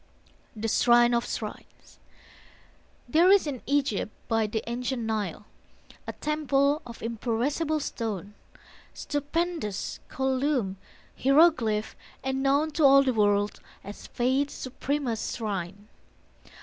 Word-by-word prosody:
THE 220 Hz, +1 st, -3 dB
SHRINE 240 Hz, +1 st, +4 dB
OF 235 Hz, 0 st, +1 dB
SHRINES -, -, -8 dB, 1.1 s
There 330 Hz, +8 st, +4 dB
is 395 Hz, -2 st, +6 dB
in 275 Hz, -5 st, -4 dB
Egypt 270 Hz, -7 st, 0 dB, 0.2 s
by 225 Hz, -2 st, +1 dB
the 220 Hz, +1 st, -3 dB
ancient 245 Hz, +1 st, -2 dB
Nile 210 Hz, -3 st, -3 dB, 0.6 s
A -, -, -4 dB
temple 295 Hz, -1 st, +1 dB
of 235 Hz, -, -10 dB
imperishable 250 Hz, +8 st, -1 dB
stone, 210 Hz, -6 st, -4 dB, 0.6 s
Stupendous, 290 Hz, -, -3 dB
columned, 265 Hz, -6 st, 0 dB, 0.4 s
hieroglyphed, 265 Hz, -7 st, +3 dB, 0.3 s
and 265 Hz, 0 st, -1 dB
known 285 Hz, +3 st, +2 dB
To 310 Hz, -, 0 dB
all 275 Hz, 0 st, +7 dB
the 260 Hz, -2 st, +1 dB
world 205 Hz, -1 st, +1 dB, 0.2 s
as 205 Hz, +1 st, -9 dB
Faith's 265 Hz, +4 st, 0 dB
supremest 255 Hz, -2 st, -3 dB
shrine. 200 Hz, -2 st, -4 dB
250 Hz, 110 wpm, -27 LUFS, 220-285 Hz, 1.1 s, all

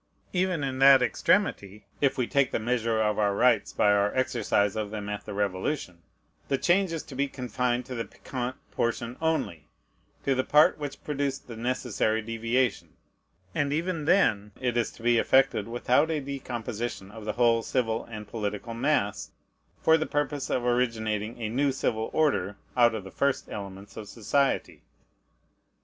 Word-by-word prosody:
Even 180 Hz, -4 st, 0 dB
in 130 Hz, -1 st, -3 dB
that 135 Hz, -1 st, +8 dB
extremity, 105 Hz, -, 0 dB, 0.2 s
(if 140 Hz, -2 st, +2 dB
we 125 Hz, -, +1 dB
take 140 Hz, +1 st, +2 dB
the -, -, -1 dB
measure 115 Hz, -1 st, 0 dB
of 105 Hz, -1 st, +1 dB
our 100 Hz, -1 st, +2 dB
rights 125 Hz, +4 st, +3 dB
by 105 Hz, -, +3 dB
our 100 Hz, 0 st, +3 dB
exercise 120 Hz, -6 st, +1 dB
of 105 Hz, -1 st, -2 dB
them 105 Hz, -1 st, -5 dB
at 105 Hz, 0 st, -5 dB
the -, -, -6 dB
Revolution,) 95 Hz, -, -2 dB, 0.5 s
the 135 Hz, -, +1 dB
change 185 Hz, +4 st, +2 dB
is 165 Hz, -2 st, -3 dB
to -, -, -12 dB
be 140 Hz, +2 st, 0 dB
confined 125 Hz, -2 st, -2 dB
to 130 Hz, -, -7 dB
the 115 Hz, -2 st, -3 dB
peccant 125 Hz, 0 st, -5 dB, 0.2 s
part 115 Hz, 0 st, 0 dB, 0.2 s
only, 120 Hz, -, -1 dB, 0.6 s
to 135 Hz, -, +2 dB
the 130 Hz, 0 st, +1 dB
part 150 Hz, +3 st, +4 dB
which 145 Hz, -2 st, -6 dB
produced 140 Hz, -2 st, -2 dB
the 120 Hz, -, -8 dB
necessary 115 Hz, -2 st, 0 dB
deviation; 115 Hz, +1 st, -1 dB, 0.6 s
and 140 Hz, -1 st, 0 dB
even 165 Hz, 0 st, -1 dB
then 105 Hz, -, +2 dB
it 125 Hz, -2 st, -1 dB
is 120 Hz, -1 st, +1 dB
to 115 Hz, -, -15 dB
be 120 Hz, -1 st, +4 dB
effected 130 Hz, -6 st, +3 dB
without 125 Hz, +6 st, +2 dB
a 160 Hz, -2 st, 0 dB
decomposition 120 Hz, -7 st, -5 dB
of 110 Hz, 0 st, -10 dB
the 105 Hz, -, -2 dB
whole 115 Hz, -1 st, +3 dB
civil 115 Hz, -2 st, -1 dB
and 105 Hz, -2 st, -8 dB
political 105 Hz, +1 st, -4 dB
mass, 115 Hz, -5 st, 0 dB, 0.5 s
for 160 Hz, 0 st, +5 dB
the 155 Hz, -, -1 dB
purpose 145 Hz, -1 st, -2 dB
of 125 Hz, -, 0 dB
originating 115 Hz, -3 st, 0 dB
a 115 Hz, -, -2 dB
new 135 Hz, +5 st, +1 dB
civil 110 Hz, -4 st, -1 dB
order 100 Hz, -11 st, +1 dB, 0.2 s
out 120 Hz, -2 st, +5 dB
of 105 Hz, -, -5 dB
the 95 Hz, -, -10 dB
first 140 Hz, -1 st, 0 dB
elements 100 Hz, 0 st, -8 dB
of 105 Hz, -2 st, -8 dB
society. 135 Hz, +5 st, 0 dB
120 Hz, 170 wpm, -27 LUFS, 110-140 Hz, 0.6 s, that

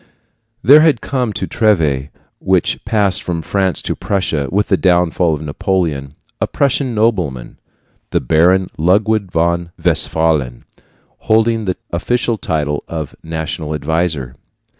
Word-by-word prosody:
There 145 Hz, +4 st, +8 dB
had 155 Hz, -7 st, +3 dB
come 125 Hz, -4 st, -2 dB
to -, -, -3 dB
Treves 80 Hz, -, +1 dB, 0.3 s
which 95 Hz, -2 st, 0 dB
passed 100 Hz, -3 st, +1 dB
from 85 Hz, -2 st, -3 dB
France 95 Hz, +1 st, -1 dB
to -, -, -2 dB
Prussia 80 Hz, -8 st, -1 dB
with 105 Hz, +2 st, 0 dB
the 95 Hz, -, +4 dB
downfall 90 Hz, -3 st, +2 dB
of 75 Hz, -, -7 dB
Napoleon 75 Hz, -3 st, -2 dB, 0.3 s
a -, -, +1 dB
Prussian 135 Hz, -3 st, 0 dB
nobleman, 90 Hz, -, -1 dB, 0.5 s
the -, -, +1 dB
Baron 90 Hz, +8 st, +3 dB
Ludwig 100 Hz, +4 st, +2 dB
von 85 Hz, 0 st, 0 dB
Westphalen, 75 Hz, -7 st, 0 dB, 0.6 s
holding 110 Hz, 0 st, +3 dB
the 90 Hz, -2 st, -2 dB
official 115 Hz, +6 st, -1 dB
title 75 Hz, -2 st, -2 dB
of 80 Hz, -3 st, -5 dB
"national 80 Hz, -1 st, -4 dB
adviser." 75 Hz, -4 st, -2 dB
85 Hz, 125 wpm, -16 LUFS, 80-105 Hz, 0.6 s, There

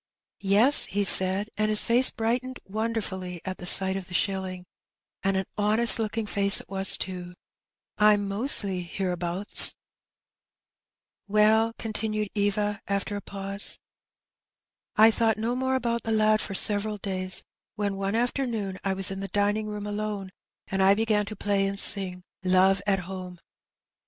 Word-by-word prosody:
" -, -, -68 dB
' -, -, -69 dB
Yes/ 210 Hz, +9 st, +3 dB
he 205 Hz, +1 st, -3 dB
said; 190 Hz, +2 st, +5 dB
and 215 Hz, 0 st, 0 dB
his 215 Hz, -1 st, +3 dB
face 245 Hz, +2 st, +4 dB
brightened 250 Hz, +3 st, -4 dB
wonderfully 195 Hz, -4 st, -6 dB
at 185 Hz, -1 st, -7 dB
the 180 Hz, -, -9 dB
sight 190 Hz, +1 st, +6 dB
of 190 Hz, -2 st, -7 dB
the 180 Hz, -, -9 dB
shilling, 185 Hz, 0 st, -4 dB, 0.6 s
and 195 Hz, 0 st, -2 dB
an 190 Hz, -, -3 dB
honest 220 Hz, +3 st, +6 dB
looking 225 Hz, 0 st, -4 dB
face 200 Hz, -1 st, +4 dB
it -, -, -15 dB
was 195 Hz, +1 st, +2 dB
too; 180 Hz, -1 st, -8 dB, 0.6 s
Tm 210 Hz, -1 st, +3 dB
mostly 200 Hz, -2 st, -1 dB
hereabouts/ 180 Hz, +1 st, +3 dB, 0.7 s
" -, -, -66 dB
Well, 215 Hz, +2 st, +1 dB
continued 215 Hz, -2 st, -4 dB
Eva, 205 Hz, 0 st, -2 dB
after 200 Hz, +1 st, -4 dB
a 205 Hz, -, -6 dB
pause, 195 Hz, 0 st, -1 dB, 0.6 s
" -, -, -68 dB
I 220 Hz, +1 st, +5 dB
thought 225 Hz, -1 st, -1 dB
no 230 Hz, +3 st, -4 dB
more 260 Hz, +1 st, -2 dB
about 235 Hz, -2 st, -3 dB
the 225 Hz, -, -6 dB
lad 215 Hz, 0 st, +1 dB
for 195 Hz, -, -6 dB
several 210 Hz, +1 st, +2 dB
days, 185 Hz, -2 st, +1 dB, 0.3 s
when 205 Hz, -1 st, -4 dB
one 195 Hz, +2 st, -4 dB
afternoon 230 Hz, -5 st, -4 dB
I 195 Hz, -, -2 dB
was 195 Hz, 0 st, +1 dB
in 195 Hz, -, -7 dB
the 195 Hz, -, -6 dB
dining 205 Hz, +2 st, -2 dB
room 210 Hz, -1 st, -7 dB
alone, 205 Hz, -2 st, -6 dB, 0.3 s
and 190 Hz, 0 st, -4 dB
I 195 Hz, +1 st, +3 dB
began 215 Hz, -1 st, -1 dB
to 215 Hz, -, -8 dB
play 200 Hz, -1 st, -2 dB
and 200 Hz, 0 st, -6 dB
sing 185 Hz, -3 st, +2 dB
' -, -, -45 dB
Love 190 Hz, +1 st, +1 dB
at 195 Hz, -1 st, 0 dB
Home. 180 Hz, 0 st, -10 dB
205 Hz, 165 wpm, -24 LUFS, 190-215 Hz, 0.7 s, sight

